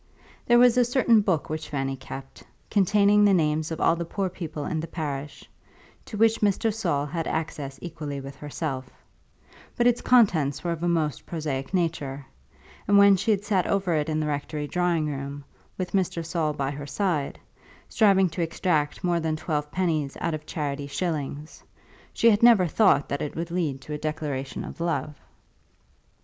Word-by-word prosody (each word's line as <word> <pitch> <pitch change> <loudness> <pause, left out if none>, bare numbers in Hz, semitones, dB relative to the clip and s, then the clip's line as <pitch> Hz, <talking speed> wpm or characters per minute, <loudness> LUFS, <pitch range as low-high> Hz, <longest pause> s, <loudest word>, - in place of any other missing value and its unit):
There 240 - +6
was 245 0 +6
a - - +6
certain 240 -2 +3
book 185 -7 0
which 155 0 -5
Fanny 135 -2 -2
kept, 135 0 -10 0.3
containing 205 +1 +4
the 200 -2 +5
names 155 -1 +1
of 160 - -5
all 165 - +3
the 170 - -3
poor 190 +3 -2
people 160 -5 -6
in 160 - -2
the 165 - -4
parish, 145 -3 -5 0.6
to 215 - -7
which 225 +1 +3
Mr. 210 +1 +2
Saul 170 -10 -1
had 165 +2 -3
access 150 -4 -4
equally 155 -5 -5
with 135 0 -9
herself; 145 -3 -5 0.9
but 240 - +1
its 245 -1 +3
contents 165 - +3
were 175 - -1
of 165 -1 -4
a 175 - 0
most 160 -4 -1
prosaic 145 -5 -3
nature, 155 -7 -2 0.6
and 205 - +5
when 200 0 +7
she 200 +4 -2
had 205 -1 +2
sat 195 -4 +1
over 195 -3 0
it 155 0 0
in 155 0 0
the 155 - -1
rectory 150 0 -3
drawing 175 0 0
room, 140 -1 -5 0.3
with 180 -2 -3
Mr. 180 -3 -1
Saul 160 -2 -1
by 140 -1 -2
her 145 0 -7
side, 155 -3 -1 0.5
striving 195 -4 +4
to 175 - -4
extract 165 -1 -1
more 175 -1 +1
than 160 -1 -1
twelve 150 -2 -2
pennies 160 -7 -1
out 165 - -1
of 155 0 -6
charity 145 -3 -3
shillings, 150 -2 -4 0.5
she 230 - +4
had 205 - +2
never 230 -6 +7
thought 175 -4 +3
that 140 - -3
it 150 - -4
would 170 +1 -4
lead 155 -7 -1
to 150 - -7
a 150 - -4
declaration 150 -4 -4
of - - -9
love. 155 -3 -1
160 Hz, 180 wpm, -26 LUFS, 145-190 Hz, 0.9 s, when